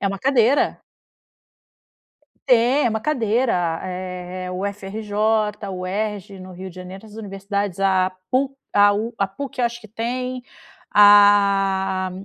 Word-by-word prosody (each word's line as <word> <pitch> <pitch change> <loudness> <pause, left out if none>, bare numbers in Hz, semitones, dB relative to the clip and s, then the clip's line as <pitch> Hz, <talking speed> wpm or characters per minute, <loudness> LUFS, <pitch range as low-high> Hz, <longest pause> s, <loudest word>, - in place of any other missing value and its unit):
É 200 - 0
uma 195 0 -4
cadeira. 265 +2 +2 1.6
Tem 250 +3 +4
é - - +3
uma 220 - -2
cadeira 225 - 0
eh 180 0 -6
UFRJ, 210 +2 -1
UERJ 195 +1 -4
no 185 0 -10
Rio 185 +1 -8
de - - -17
Janeiro 185 +3 -10
as 210 - -15
universidades 200 -2 -4
a 190 -1 +2 0.2
PU 270 +2 0 0.2
a 205 0 +5
u 225 +3 -3
a 195 - +2
PUC 265 +5 -6
acho 235 0 -1
que 220 - -13
tem, 250 +3 -4 0.5
a 195 -2 +5
205 Hz, 125 wpm, -21 LUFS, 190-225 Hz, 1.6 s, a